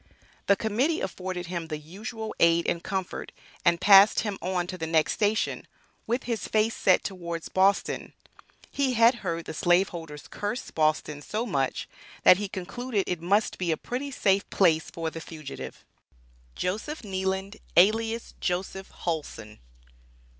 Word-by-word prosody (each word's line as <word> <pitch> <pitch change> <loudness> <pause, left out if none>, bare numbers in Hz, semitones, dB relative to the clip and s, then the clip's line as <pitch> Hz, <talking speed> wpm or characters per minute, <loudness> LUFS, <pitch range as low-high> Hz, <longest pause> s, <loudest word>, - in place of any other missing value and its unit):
The 200 - +6
Committee 240 - 0
afforded 185 -1 -4
him 170 -1 -4
the 155 -1 -4
usual 215 +8 -7
aid 170 0 +4
and 170 - -1
comfort, 190 -2 -4 0.3
and 170 -1 +3
passed 200 +2 +7
him 205 -3 -3
on 180 -1 -1
to 185 +1 -6
the 165 -3 -4
next 160 -1 +2
station, 215 +1 0 0.4
with 240 +3 0
his 230 -3 -3
face 220 +1 +2
set 185 - +3
towards 170 -3 -5
Boston. 195 +1 +1 0.6
He 275 -2 +1
had 230 +2 +6
heard 170 -2 -3
the - - -6
slaveholders 170 -3 0
"curse" 210 +5 -4
Boston 155 -1 0
so 215 +9 -3
much, 140 - -1 0.4
that 180 - +8
he 205 +1 -3
concluded 205 +4 -3
it 180 -2 -3
must 200 +5 +1
be 175 -2 0
a 160 - 0
pretty 260 - -4
safe 200 -7 +1
place 160 -5 +3
for 165 -2 -4
the 165 - -7
fugitive. 140 - -8 0.7
JOSEPH 220 +12 -3
KNEELAND, 190 +1 -2 0.2
ALIAS 225 +5 +3
JOSEPH 190 +1 -3
HULSON. 145 -10 -4
190 Hz, 145 wpm, -27 LUFS, 170-215 Hz, 0.7 s, that